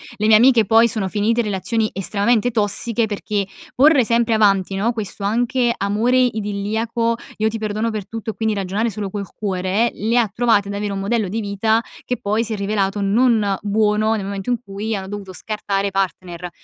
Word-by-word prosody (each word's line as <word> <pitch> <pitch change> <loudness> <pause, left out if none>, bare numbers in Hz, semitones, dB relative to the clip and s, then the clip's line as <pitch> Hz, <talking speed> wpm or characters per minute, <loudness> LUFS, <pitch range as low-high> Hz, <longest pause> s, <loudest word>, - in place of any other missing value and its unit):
le 210 - -2
mie 220 - +7
amiche 240 -1 +5
poi 225 +3 +5
sono 215 -4 -1
finite 215 +4 +1
in - - -4
relazioni 210 +3 -1
estremamente 210 +5 +1
tossiche 225 +1 0
perché 205 -1 -2 0.3
porre 280 0 +5
sempre 230 0 +1
avanti, 195 -3 +2
no, 210 +5 +1
questo 210 -2 -5
anche 240 +4 +1
amore 215 +6 +1
idilliaco 225 0 0 0.2
"Io 215 - +1
ti 225 - -4
perdono 215 +1 -2
per 215 -2 -5
tutto" 225 +1 -5
e - - -13
quindi 220 -1 -1
ragionare 200 +4 -1
solo 205 -2 -5
col 200 -1 -4
cuore, 195 +3 0
le 225 +4 0
ha 235 -2 +3
trovate 220 -4 +2
ad - - -4
avere 205 0 -3
un 195 - -3
modello 210 +1 0
di 210 +5 -3
vita 220 +2 +1 0.2
che 250 - -3
poi 210 +3 0
si 225 -1 -3
è - - -1
rivelato 200 0 -1
non 210 -1 +2
buono 215 +1 +1
nel 200 -3 -4
momento 195 +2 -5
in 245 - +2
cui 205 +2 -4
hanno 190 -1 -5
dovuto 195 -1 -7
scartare 200 0 -2
i - - -4
partner. 180 -2 -3
215 Hz, 200 wpm, -20 LUFS, 200-230 Hz, 0.3 s, mie